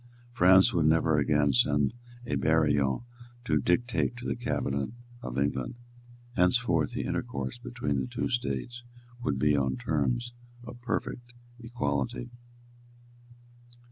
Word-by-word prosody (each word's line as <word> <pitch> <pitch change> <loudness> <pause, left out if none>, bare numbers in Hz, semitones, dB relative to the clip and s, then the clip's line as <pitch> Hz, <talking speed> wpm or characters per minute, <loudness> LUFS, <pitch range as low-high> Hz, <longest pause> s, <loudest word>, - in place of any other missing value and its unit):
France 95 -3 +6
would 80 -3 +3
never 80 -1 +3
again 75 -1 +2
send 70 +3 +2 0.3
a - - -3
Barillon 75 -2 +2 0.4
to 75 -9 +2
dictate 120 - +1
to 120 - -8
the - - -1
cabinet 70 - -2 0.3
of 65 0 -5
England. 70 - -1 0.6
Henceforth 90 -4 +2
the - - -2
intercourse 70 - -3
between 120 - -2
the 65 - -2
two - - -2
states 120 - -2 0.4
would 70 - -1
be 75 +2 +3
on 65 -2 0
terms 120 - -1 0.3
of 120 0 -10
perfect 120 +1 -4 0.3
equality. 115 - -3
75 Hz, 120 wpm, -29 LUFS, -, 0.6 s, France